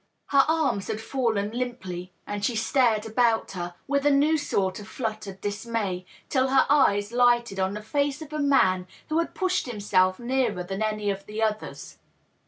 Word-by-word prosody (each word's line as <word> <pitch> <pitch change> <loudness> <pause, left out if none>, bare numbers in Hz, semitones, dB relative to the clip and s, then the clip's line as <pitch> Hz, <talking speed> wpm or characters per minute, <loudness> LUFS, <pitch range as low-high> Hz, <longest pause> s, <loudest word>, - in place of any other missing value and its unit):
Her 275 -1 +5
arms 310 -11 +1
had 215 - -3
fallen 220 -4 -1
limply, 190 -8 -5
and 205 0 -4
she 235 +2 +1
stared 225 -1 +2
about 225 0 +1
her, 175 -2 -5
with 280 0 +1
a 290 - +4
new 290 +3 +4
sort 195 -11 -1
of 205 - -10
fluttered 215 -5 -5
dismay, 205 -3 -3 0.2
till 260 -1 +2
her 265 0 +4
eyes 205 -8 +3
lighted 240 -4 +3
on 190 +1 0
the 210 - -6
face 285 +4 0
of 305 0 -12
a 305 - -2
man 190 -11 +3 0.2
who 315 +1 +1
had 335 - -2
pushed 370 -6 0
himself 195 -5 +2
nearer 240 -6 0
than 195 +3 -5
any 215 -1 0
of 195 0 -7
the 215 +1 -2
others. 215 -1 -3
220 Hz, 180 wpm, -26 LUFS, 200-265 Hz, 0.2 s, Her